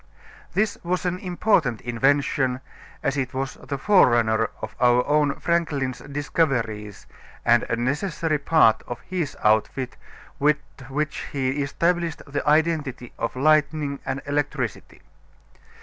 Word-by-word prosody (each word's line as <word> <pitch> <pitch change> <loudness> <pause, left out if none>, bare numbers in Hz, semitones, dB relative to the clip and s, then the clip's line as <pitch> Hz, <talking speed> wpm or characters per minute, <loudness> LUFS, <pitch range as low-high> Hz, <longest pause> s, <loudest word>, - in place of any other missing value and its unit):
This 215 +1 0
was 180 +1 -1
an 180 0 -1
important 175 - +1
invention, 130 +1 +1 0.4
as 135 +1 0
it 130 -1 -2
was 135 0 -2
the 140 - -6
forerunner 120 - +4
of 110 - -7
our 125 0 +4
own 145 -1 +2
Franklin's 145 -7 0
discoveries 115 - -2 0.4
and 120 0 +5
a - - +1
necessary 150 - -1
part 140 -6 +4
of 120 - -5
his 180 -6 -4
outfit 110 +4 +1 0.4
with 150 +1 +4 0.3
which 150 +3 -2
he 135 0 0
established 170 +4 0
the 145 0 -3
identity 150 -6 +1
of 115 - -2
lightning 150 0 +2
and 135 +1 -4
electricity. 145 -4 -3
140 Hz, 120 wpm, -24 LUFS, 125-155 Hz, 0.4 s, and